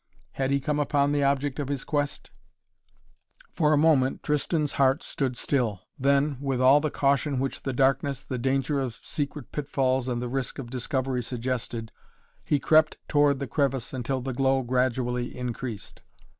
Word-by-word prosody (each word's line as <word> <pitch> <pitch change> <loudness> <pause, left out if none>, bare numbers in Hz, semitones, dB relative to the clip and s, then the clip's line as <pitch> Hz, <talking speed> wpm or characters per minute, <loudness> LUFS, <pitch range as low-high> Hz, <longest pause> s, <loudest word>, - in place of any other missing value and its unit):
Had 135 -1 -1
he 140 0 +2
come 150 +2 -1
upon 145 -1 +2
the 145 -1 +1
object 140 0 0
of 145 - -2
his 140 -2 -2
quest? 145 -1 -2 1.2
For 150 -2 +2
a 150 - +4
moment 145 -4 +3
Tristan's 150 0 0
heart 135 +3 +3
stood 130 -3 -2
still, 115 -10 0 0.2
then, 140 +1 +2
with 135 -3 -1
all 135 +3 +6
the 155 - 0
caution 140 0 +1
which 135 +1 -2
the 135 - -2
darkness, 135 +1 +1
the 130 -2 -4
danger 135 +3 0
of 130 -4 -3
secret 145 0 -4
pitfalls 135 -3 0
and 120 -2 -1
the 125 - -3
risk 130 +1 -3
of 120 -3 -7
discovery 130 0 -1
suggested, 120 -2 -4 0.5
he 145 - +2
crept 155 +2 +4
toward 145 -1 +3
the 140 - -3
crevice 135 -1 -1
until 130 +1 -2
the 130 +1 -3
glow 135 +1 +2
gradually 125 0 -1
increased. 120 -3 -5
135 Hz, 165 wpm, -26 LUFS, 125-145 Hz, 1.2 s, all